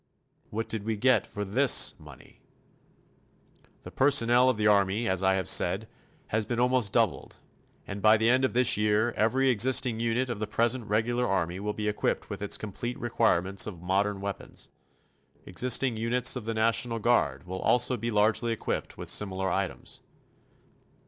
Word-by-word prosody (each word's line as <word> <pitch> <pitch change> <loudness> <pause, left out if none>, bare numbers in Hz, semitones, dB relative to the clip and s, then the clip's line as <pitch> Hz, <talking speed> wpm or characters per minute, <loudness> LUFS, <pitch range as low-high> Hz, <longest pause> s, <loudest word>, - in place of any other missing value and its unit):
What 115 +2 -4
did 110 -3 -4
we 110 0 -3
get 130 +4 +2
for 105 0 -6
this 125 +7 +4
money? - - -16 1.4
The - - -10
personnel 125 -2 +3
of 125 - 0
the 105 - -1
Army, 105 +2 +2
as 95 -1 0
I 95 0 +2
have 95 -2 -2
said, - - +2 0.4
has 110 +1 0
been 120 +2 -4
almost 125 -4 +1
doubled. - - -1 0.5
And 100 +1 -7
by 110 +1 +5
the 110 +1 0
end 130 +2 +3
of 130 - 0
this 125 +1 +3
year 105 +2 +1
every 130 +5 +1
existing 125 0 +1
unit 120 +2 -1
of 110 - -5
the 110 - -3
present 115 +2 0
regular 120 +3 0
Army 90 -1 -2
will 105 +1 -3
be 105 0 -4
equipped 105 - -2
with - - -6
its - - 0
complete 120 +4 -6
requirements 95 -5 0
of 90 -5 -9
modern 100 +2 -1
weapons. 100 0 -7 0.8
Existing 125 +4 0
units 115 +3 +1
of 125 -4 -6
the 115 0 -3
national 115 +1 +1
Guard 95 - 0
will 95 +1 -6
also 125 +1 +2
be 115 0 -4
largely 110 +2 +1
equipped 115 - -4
with - - -7
similar 95 -2 -1
items. 95 +1 -4
110 Hz, 170 wpm, -27 LUFS, 100-120 Hz, 1.4 s, by